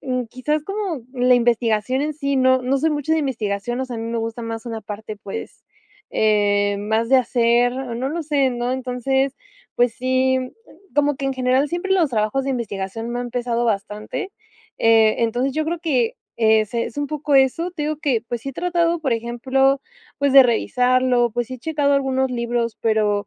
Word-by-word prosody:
mm, 255 -3 -2
quizás, 290 +6 -2
como 390 - -3
la 250 0 +4
investigación 235 +1 +1
en 305 +1 -1
sí. 280 -1 -2
No 260 0 +4
no 260 +2 +1
soy 320 +3 +1
mucho 295 +1 -1
de 320 - +3
investigación. 240 -3 -2
O - - -1
sea, 255 - -7
a - - -5
mí - - -4
me 235 - -1
gusta 225 +1 -4
más 225 0 -5
una 225 -2 -4
parte, 215 0 -7
pues, 200 -1 -8 0.5
eh, 205 -1 +2
más 220 +2 0
de 265 - +6
hacer. 240 0 +2
No 255 0 -3
lo 335 +3 -3
sé, 280 -3 +2
¿no?, 245 0 -2
entonces, 260 +1 -1 0.4
pues 245 -1 +2
sí, 260 +1 +1 0.6
como 290 0 +2
que 275 - -5
en 270 - 0
general 260 +2 +1
siempre 350 +4 -2
los 345 -6 +3
trabajos 215 +3 0
de 275 - -1
investigación 225 -2 -4
me 245 0 -2
han 245 - -4
empezado 240 -1 -1
bastante. 210 - -3 0.5
Eh, 225 -1 +4
entonces 245 +4 0
yo 310 +1 -1
creo 340 +2 -2
que, 265 -9 0 0.2
eh, 220 -1 +4
es 235 +1 -3
un 290 - -1
poco 300 -1 -2
eso. 270 +7 +2
Te 325 -4 -5
digo 300 0 -1
que, 265 -7 0
pues, 240 -1 -3
sí 275 - -6
he - - -13
tratado, 345 +1 0
por 270 -6 0
ejemplo, 260 +4 +1 0.4
pues, 280 -1 +1
de 270 0 +10
revisarlo, 250 0 +2
pues, 240 +1 -3
he 255 - -6
checado 290 0 0
algunos 265 -1 +1
libros, 235 -1 -2
pero, 210 -2 +1
250 Hz, 195 wpm, -21 LUFS, 230-275 Hz, 0.6 s, de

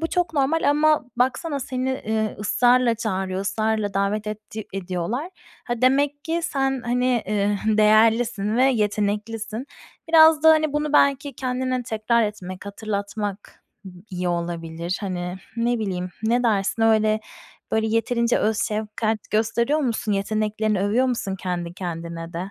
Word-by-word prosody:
bu 325 - 0
çok 355 0 -1
normal 290 +2 +2
ama 300 0 +3
baksana 275 +4 0
seni, 260 0 -3
ııı, 220 -1 -1
ısrarla 245 +3 +3
çağırıyor, 190 -4 -2
ısrarla 215 0 -1
davet 200 +2 0
etti 215 0 -6
ediyorlar. 195 - -3 0.3
Ha 240 - -2
demek 285 +3 +2
ki 330 +1 -1
sen, 270 -3 -1
hani, 245 -1 +1
eee, 205 0 0
değerlisin 215 0 +3
ve 255 - +4
yeteneklisin. 215 0 -1 0.4
Biraz 320 -1 +7
da, 320 - +8
hani, 310 -2 +3
bunu 295 0 -1
belki 280 0 +3
kendine 255 0 -2
tekrar 230 0 +1
etmek, 190 -3 -5
hatırlatmak 205 0 -5 0.5
iyi 180 -1 -2
olabilir. 170 0 -3
Hani, 180 -2 -4 0.2
ne 235 +1 +1
bileyim, 185 -4 -3
ne 235 +3 +2
dersin? 220 -1 +1
Öyle, 215 -1 +3 0.5
böyle, 220 0 +2
yeterince 235 +2 +1
öz 215 0 +1
şefkat 215 +1 -2
gösteriyor 235 +6 +1
musun? 230 -5 -1
Yeteneklerini 215 0 0
övüyor 215 +6 +2
musun 230 -6 -2
kendi 175 -2 -4
kendine 170 -2 -6
de? 180 +3 -5
220 Hz, 135 wpm, -23 LUFS, 200-255 Hz, 0.5 s, da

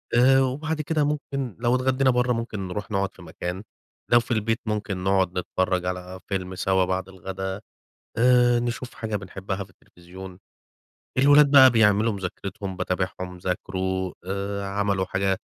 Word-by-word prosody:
آآ، 135 +2 +6
وبعد 150 +4 -1
كده 155 +1 0
ممكن 140 -5 -3
لو 120 +1 +2
اتغدينا 130 +1 +2
برّه 125 0 +2
ممكن 115 -4 -4
نروح 105 +4 -5
نقعد 100 -1 -1
في - - -15
مكان، 90 +3 -6 0.5
لو 120 - +7
في 120 - -7
البيت 115 0 0
ممكن 105 -3 -3
نقعد 95 -2 +1
نتفرج 90 0 -1
على 90 0 -5
فيلم 95 -2 -3
سوا 95 0 +2
بعد 95 0 -2
الغدا، 95 +1 -5 0.6
آآ، 120 0 +4
نشوف 120 +1 -4
حاجة 110 -2 -3
بنحبها 95 0 -5
في 95 - -21
التلفزيون. 90 0 -13 0.8
الولاد 145 +2 +6
بقى 135 -2 +9
بيعملوا 110 -1 +3
مذاكرتهم، 95 0 -5
باتابعهم، 90 0 -3
ذاكروا 95 0 -2
آآ، 100 +1 -3
عملوا 100 -1 0
حاجة 95 +1 0
100 Hz, 145 wpm, -25 LUFS, 95-120 Hz, 0.8 s, بقى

